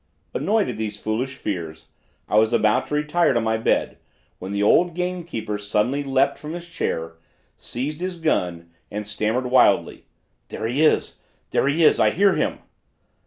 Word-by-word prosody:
Annoyed 215 Hz, -1 st, +1 dB
at 120 Hz, -, -4 dB
these 105 Hz, -2 st, -4 dB
foolish 125 Hz, +5 st, -2 dB
fears, 80 Hz, -5 st, -5 dB, 0.4 s
I -, -, -1 dB
was 110 Hz, +1 st, +2 dB
about 110 Hz, -2 st, +2 dB
to 150 Hz, -, -2 dB
retire 150 Hz, +1 st, +2 dB
to 120 Hz, -, +2 dB
my 110 Hz, 0 st, 0 dB
bed, 110 Hz, -, 0 dB, 0.4 s
when 95 Hz, +2 st, -6 dB
the 100 Hz, 0 st, 0 dB
old 170 Hz, +10 st, +4 dB
gamekeeper 170 Hz, -13 st, -3 dB
suddenly 105 Hz, +7 st, 0 dB
leaped 135 Hz, 0 st, +1 dB
from 150 Hz, +1 st, -7 dB
his 175 Hz, 0 st, -7 dB
chair, 80 Hz, -, -3 dB, 0.4 s
seized 145 Hz, +6 st, -5 dB
his 185 Hz, -1 st, -3 dB
gun 90 Hz, -, -1 dB, 0.2 s
and 105 Hz, +1 st, -5 dB
stammered 110 Hz, +5 st, -1 dB
wildly: 130 Hz, -, +3 dB, 0.4 s
'There -, -, -5 dB
he 125 Hz, +6 st, 0 dB
is, 155 Hz, -, +2 dB, 0.3 s
there -, -, +2 dB
he 155 Hz, +4 st, +2 dB
is! -, -, +5 dB
I -, -, +5 dB
hear 195 Hz, +2 st, +3 dB
him!' -, -, -1 dB
125 Hz, 165 wpm, -23 LUFS, 105-155 Hz, 0.4 s, is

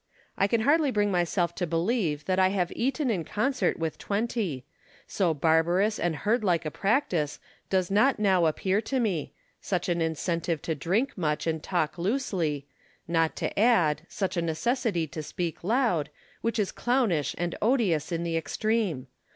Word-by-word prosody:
I 195 Hz, -, +2 dB
can 225 Hz, +2 st, +1 dB
hardly 295 Hz, +4 st, +3 dB
bring 205 Hz, -4 st, +1 dB
myself 175 Hz, -1 st, +1 dB
to 180 Hz, -, -2 dB
believe 165 Hz, -3 st, 0 dB
that 185 Hz, 0 st, +1 dB
I 185 Hz, -, +5 dB
have 185 Hz, -3 st, -1 dB
eaten 265 Hz, +1 st, 0 dB
in 180 Hz, -6 st, -1 dB
concert 255 Hz, -, 0 dB
with 160 Hz, -1 st, -3 dB
twenty; 200 Hz, -, -2 dB, 0.4 s
so 185 Hz, -4 st, +1 dB
barbarous 165 Hz, +7 st, +2 dB
and 175 Hz, -2 st, 0 dB
herdlike 185 Hz, -, +1 dB
a 155 Hz, -, -2 dB
practice 190 Hz, -, 0 dB, 0.3 s
does 185 Hz, -1 st, +1 dB
not 245 Hz, +7 st, +4 dB
now 190 Hz, -5 st, +3 dB
appear 190 Hz, +6 st, 0 dB
to 265 Hz, +4 st, -1 dB
me 195 Hz, -10 st, -1 dB
— -, -, -41 dB
such 180 Hz, -2 st, 0 dB
an 170 Hz, -1 st, +1 dB
incentive 165 Hz, 0 st, -1 dB
to 165 Hz, -, -1 dB
drink 190 Hz, -, 0 dB
much 150 Hz, -3 st, 0 dB
and 160 Hz, -1 st, -1 dB
talk 175 Hz, -2 st, -1 dB
loosely; 175 Hz, -, -1 dB, 0.4 s
not 165 Hz, -1 st, +1 dB
to -, -, -3 dB
add, 175 Hz, -10 st, +4 dB
such 195 Hz, -2 st, -2 dB
a 170 Hz, -, +1 dB
necessity 175 Hz, -, 0 dB
to 155 Hz, +1 st, -6 dB
speak 165 Hz, +2 st, -4 dB
loud, 215 Hz, -, +1 dB, 0.3 s
which 230 Hz, 0 st, -1 dB
is 210 Hz, -3 st, 0 dB
clownish 235 Hz, -, 0 dB
and 175 Hz, 0 st, -2 dB
odious 205 Hz, -, +1 dB
in 170 Hz, 0 st, -1 dB
the 165 Hz, -1 st, -2 dB
extreme. 200 Hz, -, -1 dB
180 Hz, 165 wpm, -27 LUFS, 165-220 Hz, 0.4 s, I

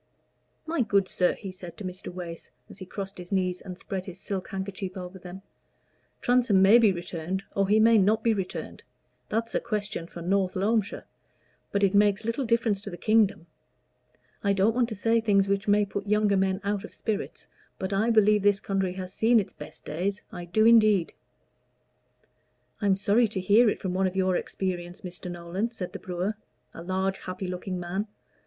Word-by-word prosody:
"My 325 Hz, -3 st, 0 dB
good 200 Hz, -4 st, +2 dB
sir," 180 Hz, -1 st, +2 dB
he 195 Hz, -3 st, -7 dB
said 185 Hz, -2 st, -11 dB
to 210 Hz, -, -8 dB
Mr. 185 Hz, 0 st, -6 dB
Wace, 175 Hz, -2 st, -7 dB, 0.2 s
as -, -, -12 dB
he 185 Hz, -, -8 dB
crossed 195 Hz, 0 st, -6 dB
his 180 Hz, +1 st, -9 dB
knees 185 Hz, -2 st, 0 dB
and 180 Hz, -2 st, -8 dB
spread 190 Hz, -1 st, -5 dB
his 185 Hz, 0 st, -8 dB
silk 190 Hz, -1 st, -4 dB
handkerchief 190 Hz, 0 st, -5 dB
over 180 Hz, +1 st, -7 dB
them, 180 Hz, +2 st, -10 dB, 0.8 s
"Transome 245 Hz, -5 st, +3 dB
may 200 Hz, +5 st, +7 dB
be 220 Hz, -4 st, +5 dB
returned, 175 Hz, +1 st, -4 dB
or 195 Hz, -1 st, +2 dB
he 210 Hz, +2 st, +4 dB
may 225 Hz, 0 st, +6 dB
not 215 Hz, +3 st, +2 dB
be 230 Hz, -, +3 dB
returned 190 Hz, -3 st, -5 dB, 0.5 s
that's 230 Hz, +1 st, -1 dB
a -, -, +2 dB
question 210 Hz, -6 st, -3 dB
for 170 Hz, -1 st, -9 dB
North 190 Hz, +1 st, +1 dB
Loamshire; 205 Hz, +2 st, 0 dB, 0.7 s
but 200 Hz, 0 st, 0 dB
it 195 Hz, 0 st, +3 dB
makes 205 Hz, +1 st, +3 dB
little 230 Hz, +4 st, -1 dB
difference 225 Hz, -3 st, +1 dB
to -, -, -7 dB
the 175 Hz, -, -7 dB
kingdom. 210 Hz, -3 st, +2 dB, 1.0 s
I 200 Hz, -1 st, +3 dB
don't 200 Hz, +3 st, +3 dB
want 245 Hz, 0 st, +1 dB
to 220 Hz, -, -4 dB
say 225 Hz, +3 st, +2 dB
things 200 Hz, -3 st, +3 dB
which 200 Hz, +1 st, 0 dB
may 205 Hz, 0 st, +4 dB
put 200 Hz, +1 st, -5 dB
younger 210 Hz, -1 st, +3 dB
men 190 Hz, 0 st, +1 dB
out 200 Hz, -1 st, -1 dB
of -, -, -10 dB
spirits, 215 Hz, -1 st, -4 dB, 0.3 s
but 190 Hz, +1 st, -3 dB
I 215 Hz, +4 st, +2 dB
believe 215 Hz, -2 st, +4 dB
this 205 Hz, 0 st, +3 dB
country 195 Hz, -2 st, -1 dB
has 185 Hz, 0 st, -6 dB
seen 230 Hz, +2 st, +4 dB
it's 200 Hz, -, -4 dB
best 150 Hz, -, -11 dB
days 190 Hz, +6 st, -2 dB
I 175 Hz, -1 st, -7 dB
do, 215 Hz, +6 st, +2 dB
indeed." 215 Hz, -6 st, +5 dB, 1.7 s
"I 205 Hz, -, +1 dB
am 195 Hz, -, +4 dB
sorry 205 Hz, +4 st, +3 dB
to 210 Hz, -2 st, -3 dB
hear 215 Hz, +5 st, +5 dB
it -, -, -2 dB
from 185 Hz, -2 st, -3 dB
one 190 Hz, +1 st, +2 dB
of 185 Hz, -, -5 dB
your 185 Hz, -1 st, +2 dB
experience, 175 Hz, -1 st, -3 dB
Mr. 180 Hz, -1 st, -7 dB
Nolan," 175 Hz, +5 st, -3 dB
said 195 Hz, -6 st, -6 dB
the -, -, -6 dB
brewer, 185 Hz, +4 st, -3 dB, 0.4 s
a -, -, -9 dB
large, 190 Hz, +2 st, -1 dB
happy 185 Hz, +1 st, -6 dB
looking 180 Hz, 0 st, -4 dB
man. 185 Hz, +4 st, -3 dB
195 Hz, 195 wpm, -27 LUFS, 185-210 Hz, 1.7 s, may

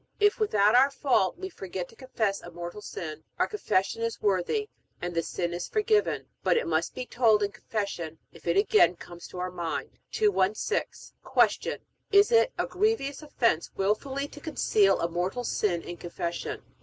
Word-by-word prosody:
If 415 Hz, +1 st, +4 dB
without 210 Hz, -, +3 dB
our 260 Hz, +3 st, +6 dB
fault 270 Hz, -, +1 dB
we 380 Hz, +1 st, -5 dB
forget 190 Hz, -, -6 dB
to -, -, -17 dB
confess 220 Hz, -6 st, -2 dB
a -, -, -9 dB
mortal 175 Hz, +4 st, -7 dB
sin, 160 Hz, -5 st, -6 dB
our -, -, +3 dB
Confession 225 Hz, -, 0 dB
is 230 Hz, 0 st, -2 dB
worthy, 205 Hz, -, +1 dB, 0.3 s
and 175 Hz, 0 st, -4 dB
the 165 Hz, -, +1 dB
sin 170 Hz, +1 st, -3 dB
is 175 Hz, 0 st, -4 dB
forgiven; 425 Hz, -1 st, +1 dB, 0.2 s
but -, -, +3 dB
it 470 Hz, -, 0 dB
must -, -, 0 dB
be 255 Hz, -, -4 dB
told 225 Hz, -4 st, +3 dB
in 200 Hz, -, 0 dB
Confession 185 Hz, -9 st, -4 dB, 0.2 s
if -, -, -14 dB
it 170 Hz, +2 st, +2 dB
again 200 Hz, -3 st, +5 dB
comes 175 Hz, 0 st, -11 dB
to -, -, -10 dB
our 180 Hz, 0 st, -3 dB
mind. 170 Hz, -2 st, -4 dB
216. 405 Hz, -, 0 dB, 0.5 s
Q. -, -, -3 dB, 0.3 s
Is 405 Hz, +2 st, +6 dB
it 470 Hz, +2 st, +5 dB
a -, -, +1 dB
grievous 365 Hz, -8 st, 0 dB
offense 235 Hz, -, +1 dB
wilfully 265 Hz, +8 st, -1 dB
to 295 Hz, -, -12 dB
conceal 215 Hz, -10 st, +3 dB
a 170 Hz, -, +1 dB
mortal 180 Hz, +8 st, -2 dB
sin 180 Hz, -7 st, 0 dB
in 175 Hz, -, -7 dB
Confession? 170 Hz, 0 st, -4 dB
210 Hz, 175 wpm, -28 LUFS, 175-285 Hz, 0.5 s, our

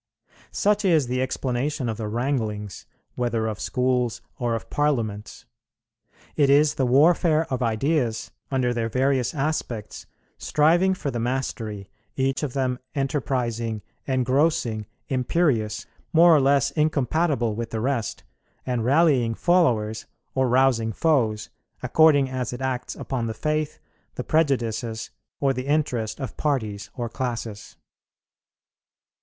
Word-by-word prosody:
Such 210 Hz, +1 st, +1 dB
is 165 Hz, -7 st, +3 dB
the 125 Hz, +1 st, -1 dB
explanation 130 Hz, +1 st, -2 dB
of 110 Hz, -2 st, -2 dB
the 110 Hz, -2 st, -4 dB
wranglings, 110 Hz, -4 st, -3 dB, 0.3 s
whether 120 Hz, -2 st, -1 dB
of 110 Hz, -1 st, -3 dB
schools 125 Hz, -2 st, 0 dB, 0.2 s
or 120 Hz, -2 st, 0 dB
of 115 Hz, -, -7 dB
parliaments. 115 Hz, -9 st, -1 dB, 0.9 s
It 140 Hz, -2 st, +3 dB
is 145 Hz, +1 st, +5 dB
the 130 Hz, -, 0 dB
warfare 160 Hz, +4 st, +4 dB
of 130 Hz, -, -1 dB
ideas 120 Hz, +1 st, 0 dB, 0.2 s
under 130 Hz, -3 st, +1 dB
their 115 Hz, -1 st, -1 dB
various 130 Hz, +2 st, +1 dB
aspects 135 Hz, -7 st, -3 dB, 0.3 s
striving 175 Hz, +5 st, +3 dB
for 145 Hz, -6 st, -3 dB
the 120 Hz, -, -3 dB
mastery, 115 Hz, -5 st, -3 dB, 0.2 s
each 135 Hz, 0 st, 0 dB
of 145 Hz, -5 st, -3 dB
them 130 Hz, -2 st, -1 dB, 0.2 s
enterprising, 120 Hz, -6 st, -1 dB, 0.2 s
engrossing, 130 Hz, -4 st, +1 dB, 0.2 s
imperious, 130 Hz, -5 st, 0 dB, 0.3 s
more 170 Hz, 0 st, +7 dB
or 145 Hz, -, +4 dB
less 140 Hz, 0 st, +3 dB
incompatible 150 Hz, -4 st, +1 dB
with 115 Hz, +1 st, -4 dB
the 110 Hz, -, -3 dB
rest, 120 Hz, -2 st, -2 dB, 0.4 s
and 125 Hz, -3 st, -1 dB
rallying 130 Hz, -4 st, +3 dB
followers 115 Hz, -13 st, +1 dB, 0.3 s
or 130 Hz, -1 st, +1 dB
rousing 125 Hz, -3 st, +3 dB
foes, 115 Hz, -8 st, +1 dB, 0.3 s
according 145 Hz, +1 st, +5 dB
as 130 Hz, -1 st, -3 dB
it 125 Hz, -, -6 dB
acts 130 Hz, -1 st, -3 dB
upon 125 Hz, -4 st, -3 dB
the 110 Hz, -, -4 dB
faith, 155 Hz, +5 st, -1 dB, 0.4 s
the -, -, -4 dB
prejudices, 120 Hz, -7 st, 0 dB, 0.3 s
or 135 Hz, -1 st, +2 dB
the 130 Hz, +1 st, -5 dB
interest 130 Hz, -7 st, 0 dB
of 135 Hz, -, -6 dB
parties 110 Hz, -9 st, -2 dB
or 120 Hz, -3 st, -3 dB
classes. 115 Hz, -3 st, -5 dB
130 Hz, 125 wpm, -24 LUFS, 115-145 Hz, 0.9 s, more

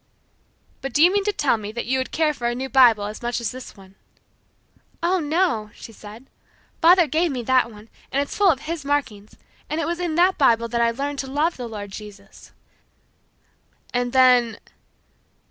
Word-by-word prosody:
"But 270 Hz, -2 st, -5 dB
do 295 Hz, -, +4 dB
you 355 Hz, +2 st, +5 dB
mean 405 Hz, -1 st, +1 dB
to 415 Hz, -, +2 dB
tell 290 Hz, -, +1 dB
me 210 Hz, -1 st, -7 dB
that 235 Hz, -, -4 dB
you 260 Hz, +2 st, 0 dB
would 260 Hz, -, -3 dB
care 310 Hz, -1 st, +1 dB
for 240 Hz, -4 st, -3 dB
a 240 Hz, -, -1 dB
new 265 Hz, +2 st, -4 dB
Bible 245 Hz, -6 st, +5 dB
as 210 Hz, +1 st, -6 dB
much 240 Hz, 0 st, -2 dB
as 230 Hz, -4 st, -3 dB
this 255 Hz, -3 st, -10 dB
one?" 190 Hz, -1 st, -16 dB, 1.1 s
"Oh, 365 Hz, +2 st, +2 dB
no," 305 Hz, -, 0 dB
she -, -, -11 dB
said, 215 Hz, +3 st, -13 dB, 0.6 s
"Father 350 Hz, +1 st, +6 dB
gave 320 Hz, +4 st, 0 dB
me 250 Hz, -3 st, -4 dB
that 255 Hz, -1 st, +2 dB
one, 210 Hz, 0 st, -14 dB, 0.2 s
and 275 Hz, -, 0 dB
it's 285 Hz, -, -3 dB
full 405 Hz, -2 st, +4 dB
of 275 Hz, -6 st, +1 dB
his 325 Hz, -2 st, -5 dB
markings, 265 Hz, -8 st, -3 dB, 0.3 s
and 310 Hz, -, -2 dB
it 325 Hz, -, -1 dB
was 340 Hz, +2 st, -3 dB
in 345 Hz, -3 st, -2 dB
that 360 Hz, +3 st, +3 dB
Bible 235 Hz, -4 st, +3 dB
that 235 Hz, 0 st, -1 dB
I 235 Hz, -, +3 dB
learned 280 Hz, +4 st, -4 dB
to 270 Hz, -, -4 dB
love 300 Hz, +5 st, 0 dB
the 245 Hz, -2 st, -6 dB
Lord 205 Hz, -3 st, -8 dB
Jesus." 205 Hz, -1 st, -12 dB, 1.4 s
"And 245 Hz, 0 st, -1 dB
then 250 Hz, -3 st, +4 dB
260 Hz, 195 wpm, -22 LUFS, 230-310 Hz, 1.4 s, Father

